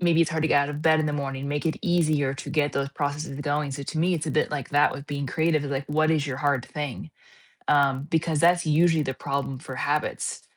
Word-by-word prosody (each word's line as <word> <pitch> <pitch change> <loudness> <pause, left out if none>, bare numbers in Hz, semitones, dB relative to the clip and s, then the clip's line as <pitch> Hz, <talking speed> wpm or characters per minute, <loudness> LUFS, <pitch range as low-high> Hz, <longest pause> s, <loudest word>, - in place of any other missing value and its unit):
maybe 170 -2 +3
it's 165 - +3
hard 160 -1 -1
to 160 - +2
get 145 - +4
out 140 - -3
of 145 0 -5
bed 160 -1 +4
in 155 - 0
the 150 - -1
morning, 140 -1 -3
make 145 +2 -2
it 160 - 0
easier 155 -6 +2
to 135 - -7
get 150 -2 +1
those 140 0 -1
processes 145 -1 -3
going, 145 0 -1
so 135 +1 -5
to 155 +3 -4
me, 175 +3 +2
it's 160 -1 -3
a - - -1
bit 155 - +1
like 145 -4 -4
that 145 +1 +4
with 140 +1 -7
being 140 -1 -3
creative, 160 0 +1
like, 140 -1 -2
what 155 +1 +2
is 155 -3 +2
your 135 -3 -3
hard 140 -3 0
thing? 145 - -5 0.6
Um, 140 -2 +3
because 160 -1 +1
that's 175 +1 +4
usually 160 +1 +3
the 135 - -2
problem 140 -1 -3
for 130 -2 -8
habits, 145 +3 -2
145 Hz, 250 wpm, -25 LUFS, 140-160 Hz, 0.6 s, get